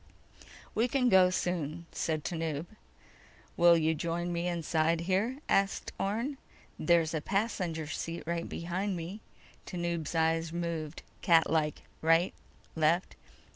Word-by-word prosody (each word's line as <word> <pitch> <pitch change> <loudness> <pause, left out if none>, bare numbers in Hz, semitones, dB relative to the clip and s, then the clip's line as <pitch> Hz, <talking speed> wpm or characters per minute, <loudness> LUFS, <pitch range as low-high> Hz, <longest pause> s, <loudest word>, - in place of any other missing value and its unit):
"We 230 +3 +2
can 250 -1 +2
go 185 -3 +7
soon," 170 -3 -2
said 155 -2 -1
Tanub. 160 -2 -2 0.9
"Will 170 0 +6
you 160 0 +2
join 170 +2 -2
me 170 +1 -1
inside 165 -1 +1
here?" 195 +9 0
asked 195 0 +1
Orne. 230 +8 -1 0.4
"There's 165 0 +3
a 160 - -1
passenger 185 -5 -1
seat 165 +2 -4
right 170 0 -2
behind 180 +3 -2
me." 175 +6 -6 0.5
Tanub's 170 -2 -3
eyes 165 0 +2
moved 165 -2 -4 0.2
catlike: 160 -2 +3 0.2
right, 165 +3 +4 0.4
left. 160 +3 +2
170 Hz, 120 wpm, -31 LUFS, 160-180 Hz, 0.9 s, go